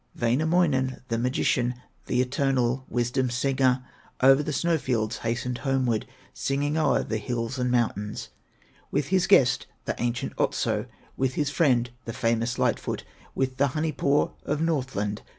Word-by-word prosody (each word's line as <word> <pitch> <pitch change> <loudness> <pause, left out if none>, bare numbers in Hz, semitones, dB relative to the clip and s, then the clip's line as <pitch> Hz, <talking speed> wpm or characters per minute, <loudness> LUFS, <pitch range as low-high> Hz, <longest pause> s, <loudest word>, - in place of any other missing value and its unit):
Wainamoinen, 130 0 +1
the 115 -1 0
magician, 125 0 +1 0.3
The 125 - +2
eternal 130 -1 0
wisdom 125 +1 0
singer, 130 0 +1 0.4
O'er 135 +2 +7
the 150 - -3
snow 165 +2 +1
fields 115 -4 -1
hastened 120 +2 -2
homeward, 130 -5 0 0.3
Singing 145 +2 -1
o'er 160 - +2
the 110 - -2
hills 115 +3 -3
and 125 0 +1
mountains, 110 -4 -1 0.6
With 140 0 -1
his 190 0 +2
guest, 130 -10 +4 0.2
the - - -1
ancient 120 0 -1
Otso, - - 0 0.3
With 130 -1 0
his 145 -2 0
friend, 125 -7 +2
the 115 - -4
famous 115 +2 0
Light - - +2
foot, - - -4 0.3
With 130 -1 -1
the 140 - +3
Honey 155 +1 0
paw 140 +1 +1
of 150 +1 -1
Northland. 130 -10 -1
130 Hz, 150 wpm, -26 LUFS, 120-140 Hz, 0.6 s, O'er